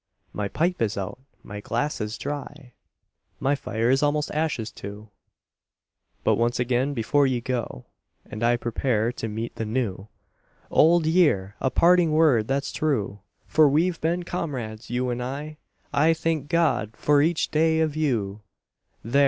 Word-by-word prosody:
My 105 Hz, -1 st, -2 dB
pipe 170 Hz, -, -1 dB
is 110 Hz, -2 st, 0 dB
out, 100 Hz, +5 st, -4 dB, 0.2 s
my 105 Hz, -, -7 dB
glass 120 Hz, +6 st, -2 dB
is 105 Hz, +1 st, -3 dB
dry; 145 Hz, -3 st, -6 dB, 0.7 s
My 135 Hz, -, +1 dB
fire 115 Hz, -3 st, -1 dB
is 135 Hz, -, +3 dB
almost 150 Hz, 0 st, +1 dB
ashes 150 Hz, -8 st, -1 dB
too; 105 Hz, +2 st, -9 dB, 1.1 s
But -, -, +3 dB
once 120 Hz, +1 st, +1 dB
again, 125 Hz, +3 st, 0 dB
before 135 Hz, +5 st, +2 dB
you 130 Hz, -2 st, 0 dB
go, 120 Hz, -, -4 dB, 0.4 s
And 110 Hz, -, -8 dB
I 120 Hz, +1 st, +3 dB
prepare 120 Hz, -1 st, 0 dB
to 115 Hz, -, -5 dB
meet 110 Hz, +2 st, -5 dB
the -, -, -2 dB
New: 105 Hz, -4 st, -2 dB, 0.6 s
Old 165 Hz, +1 st, +5 dB
Year! 150 Hz, -, +2 dB
a 130 Hz, -, +2 dB
parting 170 Hz, +3 st, +4 dB
word 145 Hz, -9 st, +4 dB
that's 135 Hz, +1 st, -1 dB
true, 110 Hz, -10 st, -1 dB, 0.3 s
For 155 Hz, -2 st, +4 dB
we've 165 Hz, +4 st, +1 dB
been 170 Hz, +3 st, 0 dB
comrades, 125 Hz, -11 st, -5 dB
you 125 Hz, +1 st, -1 dB
and 120 Hz, 0 st, -3 dB
I 145 Hz, +5 st, -5 dB
— -, -, -39 dB
I 160 Hz, +3 st, +4 dB
THANK 160 Hz, -3 st, -2 dB
GOD 155 Hz, -10 st, +1 dB
FOR 145 Hz, -1 st, +3 dB
EACH 160 Hz, +2 st, +1 dB
DAY 160 Hz, +1 st, +3 dB
OF 155 Hz, -2 st, 0 dB
YOU; 110 Hz, -10 st, -1 dB, 0.6 s
There! 120 Hz, +6 st, +1 dB
130 Hz, 160 wpm, -25 LUFS, 115-155 Hz, 1.1 s, Old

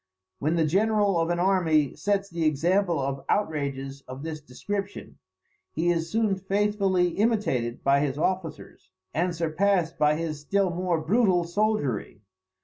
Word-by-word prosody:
When 155 Hz, +4 st, 0 dB
the 165 Hz, -2 st, +2 dB
general 205 Hz, +2 st, +2 dB
of 165 Hz, 0 st, 0 dB
an 175 Hz, -, 0 dB
army 170 Hz, -6 st, +2 dB
sets 200 Hz, -1 st, 0 dB
the 170 Hz, -3 st, -3 dB
example 170 Hz, +3 st, +2 dB
of 135 Hz, 0 st, -3 dB
outrages 140 Hz, -7 st, -2 dB
of 130 Hz, +2 st, -8 dB
this 155 Hz, -1 st, -5 dB
description, 200 Hz, +9 st, -6 dB, 0.5 s
he 170 Hz, +2 st, +1 dB
is 165 Hz, -1 st, -1 dB
soon 215 Hz, -1 st, +1 dB
faithfully 195 Hz, -2 st, +1 dB
imitated 185 Hz, -, 0 dB
by 140 Hz, 0 st, +4 dB
his 140 Hz, -2 st, -1 dB
officers, 160 Hz, -, -3 dB, 0.2 s
and 175 Hz, +3 st, 0 dB
surpassed 170 Hz, +1 st, 0 dB
by 150 Hz, 0 st, +4 dB
his 155 Hz, -2 st, -3 dB
still 195 Hz, +4 st, +1 dB
more 175 Hz, -1 st, -1 dB
brutal 185 Hz, +1 st, +2 dB
soldiery. 170 Hz, -, -1 dB
170 Hz, 140 wpm, -26 LUFS, 150-195 Hz, 0.5 s, by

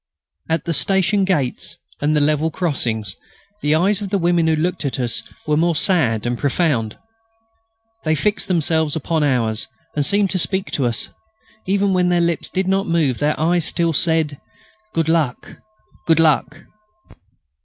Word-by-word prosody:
At 160 Hz, +1 st, -1 dB
the 170 Hz, -, -1 dB
station 195 Hz, +6 st, +2 dB
gates 145 Hz, -10 st, -2 dB, 0.2 s
and 150 Hz, +1 st, +1 dB
the 150 Hz, -, +3 dB
level 150 Hz, +2 st, +1 dB
crossings, 115 Hz, -, -2 dB, 0.5 s
the 150 Hz, +1 st, +2 dB
eyes 195 Hz, +5 st, +1 dB
of 200 Hz, -, -4 dB
the 200 Hz, -, +1 dB
women 170 Hz, -2 st, +2 dB
who 160 Hz, -, +3 dB
looked 165 Hz, +3 st, -1 dB
at 140 Hz, -2 st, -2 dB
us 120 Hz, -3 st, -1 dB, 0.2 s
were 150 Hz, -, +1 dB
more 170 Hz, +2 st, +2 dB
sad 130 Hz, -, +1 dB
and 120 Hz, 0 st, -2 dB
profound. 140 Hz, -7 st, 0 dB, 1.1 s
They 155 Hz, 0 st, +1 dB
fixed 205 Hz, +9 st, 0 dB
themselves 160 Hz, -3 st, +1 dB
upon 160 Hz, 0 st, -1 dB
ours, 115 Hz, -6 st, 0 dB, 0.3 s
and 145 Hz, -, +1 dB
seemed 200 Hz, +5 st, +2 dB
to 185 Hz, -, +1 dB
speak 190 Hz, +2 st, 0 dB
to 135 Hz, -4 st, 0 dB
us. 120 Hz, 0 st, -2 dB
And -, -, -21 dB, 0.6 s
even 195 Hz, 0 st, +1 dB
when 180 Hz, -1 st, +2 dB
their 175 Hz, -1 st, +2 dB
lips 170 Hz, -1 st, 0 dB
did 190 Hz, 0 st, -1 dB
not 195 Hz, +1 st, +1 dB
move 155 Hz, -7 st, +1 dB
their 150 Hz, +1 st, 0 dB
eyes 170 Hz, +1 st, +1 dB
still 170 Hz, -1 st, 0 dB
said 160 Hz, -2 st, +1 dB, 0.5 s
"Good 165 Hz, -4 st, -1 dB
luck!... 160 Hz, -6 st, -1 dB, 0.5 s
Good 165 Hz, -1 st, +4 dB
luck!" 155 Hz, -1 st, +1 dB
160 Hz, 165 wpm, -20 LUFS, 145-180 Hz, 1.1 s, Good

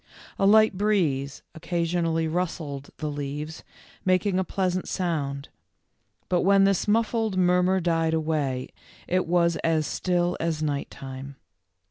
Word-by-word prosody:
A 195 Hz, -, +4 dB
light 215 Hz, 0 st, +6 dB
breeze 155 Hz, -10 st, 0 dB
occasionally 165 Hz, -1 st, -1 dB
rustled 160 Hz, -5 st, -3 dB
the 155 Hz, -, -3 dB
leaves, 145 Hz, +2 st, -5 dB, 0.4 s
making 185 Hz, +1 st, +2 dB
a -, -, +1 dB
pleas 185 Hz, 0 st, -1 dB
ant 185 Hz, -, -3 dB
sound. 145 Hz, -6 st, -2 dB, 0.8 s
But 180 Hz, -1 st, +1 dB
when 195 Hz, +1 st, +5 dB
this 195 Hz, 0 st, +2 dB
muffled 220 Hz, -1 st, +1 dB
murmur 180 Hz, +1 st, +3 dB
died 165 Hz, -2 st, +1 dB
away, 150 Hz, -5 st, -1 dB, 0.4 s
it 185 Hz, -1 st, 0 dB
was 170 Hz, -1 st, +2 dB
as 160 Hz, -2 st, +1 dB
still 175 Hz, +1 st, 0 dB
as 160 Hz, -2 st, -1 dB
night 145 Hz, -2 st, -2 dB
time. 135 Hz, +1 st, -8 dB
170 Hz, 130 wpm, -26 LUFS, 150-185 Hz, 0.8 s, light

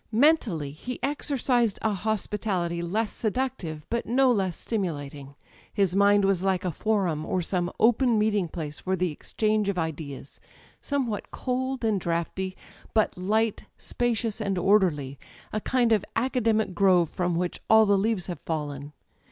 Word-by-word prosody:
Mentally 220 Hz, -, +2 dB
he 245 Hz, -, -6 dB
exercised 255 Hz, -5 st, +1 dB
a 220 Hz, -1 st, +2 dB
hospitality 195 Hz, -4 st, -1 dB
less 210 Hz, +6 st, -1 dB
seductive 215 Hz, -, -2 dB
but 235 Hz, 0 st, -1 dB
no 255 Hz, +3 st, +4 dB
less 190 Hz, -6 st, 0 dB
stimulating. 145 Hz, -, -4 dB, 0.4 s
His 195 Hz, -3 st, +1 dB
mind 200 Hz, 0 st, +5 dB
was 195 Hz, -2 st, +2 dB
like 190 Hz, -1 st, 0 dB
a 180 Hz, -, 0 dB
forum, 180 Hz, -4 st, 0 dB
or 180 Hz, +2 st, -1 dB
some 175 Hz, 0 st, -1 dB
open 240 Hz, +1 st, +4 dB
meeting 210 Hz, -3 st, +1 dB
place 155 Hz, -2 st, -6 dB
for 190 Hz, 0 st, -1 dB
the 180 Hz, -2 st, 0 dB
exchange 215 Hz, +6 st, 0 dB
of 195 Hz, -, -2 dB
ideas: 150 Hz, -4 st, -5 dB, 0.4 s
somewhat 255 Hz, -7 st, -2 dB
cold 260 Hz, -1 st, -2 dB
and 210 Hz, -4 st, +1 dB
draughty, 175 Hz, +3 st, -2 dB, 0.4 s
but 215 Hz, -, +2 dB
light, 215 Hz, +4 st, 0 dB
spacious 230 Hz, -2 st, -1 dB
and 195 Hz, -3 st, -1 dB
orderly 170 Hz, -9 st, +2 dB, 0.3 s
â€" 215 Hz, -, 0 dB
^a -, -, -22 dB
kind 245 Hz, -3 st, +2 dB
of 215 Hz, -4 st, +3 dB
academic 230 Hz, -4 st, +1 dB
grove 180 Hz, -3 st, +4 dB
from 175 Hz, +2 st, -1 dB
which 175 Hz, +1 st, -2 dB
all 220 Hz, 0 st, +7 dB
the 200 Hz, -1 st, +4 dB
leaves 200 Hz, -1 st, 0 dB
have 175 Hz, -5 st, -5 dB
fallen. 145 Hz, -2 st, -4 dB
200 Hz, 150 wpm, -26 LUFS, 170-225 Hz, 0.4 s, all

